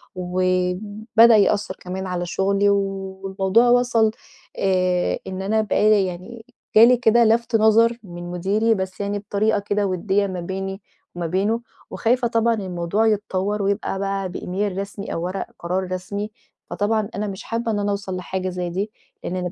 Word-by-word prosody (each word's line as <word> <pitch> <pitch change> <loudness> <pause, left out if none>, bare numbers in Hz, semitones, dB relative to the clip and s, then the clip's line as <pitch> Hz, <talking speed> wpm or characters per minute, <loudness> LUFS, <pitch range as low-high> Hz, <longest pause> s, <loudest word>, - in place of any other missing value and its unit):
وبدأ 185 +5 +2
يأثَّر 205 -1 +2
كمان 190 +1 -5
على 180 -1 -2
شغلي 200 +3 +1
والموضوع 195 +2 +1
وصَل 240 -3 +3 0.5
آآ، 185 -2 +1
إن 190 0 -5
أنا 215 +3 +1
بقى 215 0 +2
لي 205 -3 +4
يعني 185 +6 -8 0.3
جالي 235 +3 +8
كده 235 0 +4
لَفت 230 +1 +2
نَظَر 225 +2 +4
من 175 -2 -8
مديري، 200 +6 +1
بس 190 -1 -4
يعني 200 0 -2
بطريقة 205 +1 0
كده 205 0 -1
وديَّة 195 +2 0
ما 185 -2 -4
بيني 195 +2 -5 0.3
وما 175 -1 -3
بينه، 200 +7 0 0.3
وخايفة 245 +1 +1
طبعًا 230 0 +2
الموضوع 190 +1 -1
يتطوّر 205 -1 0
ويبقى 200 0 -1
بقى 195 -1 -2
بإيميل 190 +2 -3
رسمي 200 +1 -5
أو 165 - -3
ورق 185 +2 -3
قرار 180 +2 -1
رسمي، 200 +3 -4 0.4
فطبعًا 215 +1 0
أنا 210 +1 -2
مش 195 -1 -6
حابة 230 0 -2
إن 210 - -1
أنا 205 0 0
أوصَل 195 -2 -3
لحاجة 185 +1 -3
زي 180 -1 -3
دي، 195 +5 -3 0.3
لأن 180 - -3
أنا 180 -1 -3
200 Hz, 160 wpm, -22 LUFS, 185-215 Hz, 0.5 s, جالي